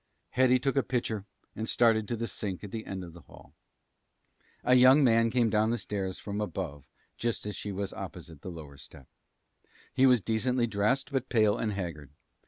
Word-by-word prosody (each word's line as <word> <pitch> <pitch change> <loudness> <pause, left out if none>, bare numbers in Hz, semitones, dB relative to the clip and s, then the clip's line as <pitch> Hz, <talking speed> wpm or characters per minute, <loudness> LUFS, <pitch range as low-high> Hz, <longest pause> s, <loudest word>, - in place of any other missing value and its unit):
Hetty 130 0 +4
took 135 +2 -1
a - - +5
pitcher 115 -6 -2 0.3
and 110 +1 -4
started 110 -3 +3
to 120 - -2
the 115 - -2
sink 100 -2 -5
at 100 - -7
the 110 -1 -6
end 95 -1 -5
of 85 -2 -10
the 85 - -13
hall. - - -17 1.1
A 125 - +3
young 130 +3 +7
man 115 -2 +4
came 120 -2 +2
down 110 0 +2
the 120 - 0
stairs 95 -4 -3
from 105 0 -4
above 85 -9 -5 0.3
just 120 -3 -2
as 105 - -4
she 105 - -5
was 100 0 -4
opposite 85 -6 -8
the - - -7
lower 75 -5 -10
step. 70 - -13 0.9
He 135 - +5
was 125 -2 +5
decently 115 +5 0
dressed, 115 +6 0
but 135 -1 -2
pale 110 -3 +3
and 110 -2 -2
haggard. 85 -7 -5
110 Hz, 190 wpm, -29 LUFS, 95-120 Hz, 1.1 s, young